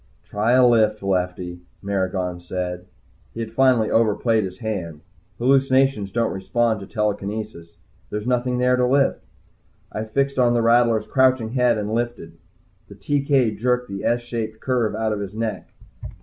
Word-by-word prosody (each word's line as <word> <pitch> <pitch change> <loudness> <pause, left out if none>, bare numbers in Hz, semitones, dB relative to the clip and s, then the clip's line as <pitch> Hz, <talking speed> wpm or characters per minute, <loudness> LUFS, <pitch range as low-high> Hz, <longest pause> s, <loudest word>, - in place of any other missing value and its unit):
"Try 110 +4 0
a 130 0 +6
lift, 110 -3 +2
Lefty," 90 -2 -2 0.2
Maragon 95 -2 -2
said. 90 0 -5 0.5
He - - -6
had 110 -1 -5
finally 125 -3 +3
overplayed 110 0 +2
his 95 0 -8
hand. 90 -9 -5 0.4
Hallucinations 135 -4 +2
don't 115 +2 0
respond 110 +4 0
to 100 - -9
telekinesis 105 -4 -4 0.3
there's 105 0 -4
nothing 125 0 0
there 125 0 +3
to 125 - +2
lift. 135 +1 +2 0.7
I 110 - -4
fixed 140 +4 -1
on 120 -1 +3
the 115 - +2
rattler's 115 -1 +3
crouching 130 -4 +2
head 125 -2 +2
and 105 +1 -3
lifted. 115 -9 -4 0.5
The - - -13
TK 140 -7 0
jerked 125 0 0
the 100 0 -6
S 120 +1 +1
shaped 115 -2 -5
curve 120 -5 0
out 110 0 -1
of 105 - -3
his 100 0 -6
neck. 110 -3 -4
110 Hz, 155 wpm, -22 LUFS, 100-125 Hz, 0.7 s, a